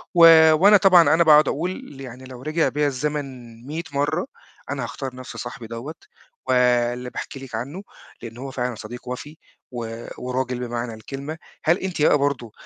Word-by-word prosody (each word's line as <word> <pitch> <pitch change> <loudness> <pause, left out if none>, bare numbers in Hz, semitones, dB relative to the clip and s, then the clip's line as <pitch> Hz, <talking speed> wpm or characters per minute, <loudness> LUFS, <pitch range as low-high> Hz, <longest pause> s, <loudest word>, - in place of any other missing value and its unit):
و 160 -2 +8
وأنا 200 +6 +7
طبعًا 180 -4 +6
أنا 170 +1 +5
باقعُد 150 -2 +6
أقول 170 +6 -1 0.3
ل - - -10
يعني 130 0 -9
لو 130 -1 -10
رجع 155 +3 +1
بيّا 150 0 0
الزمن 145 +2 -2 0.4
مِيّة 160 +3 -4
مَرّة 150 - 0 0.4
أنا - - -3
هاختار 130 -2 -6
نَفْس 130 0 -9
صاحبي 120 -2 -7
دَوّة 120 +8 -7 0.5
واللي 125 0 +2
باحكي 135 - -7
لِك 130 -4 -8
عنّه، 140 - -5 0.4
لإن 115 0 -9
هو 135 +1 -6
فعلًا 125 -2 -3
صديق 120 +4 -9
وَفي 145 +5 -7 0.3
و 115 -1 -6
وراجل 125 0 -3
بمعنى 120 -1 -4
الكلمة، 140 +8 -7 0.3
هل 170 +4 +3
أنتِ 185 -5 -4
بقى 150 - +5
برضه 140 -5 -1
135 Hz, 170 wpm, -23 LUFS, 125-155 Hz, 0.5 s, و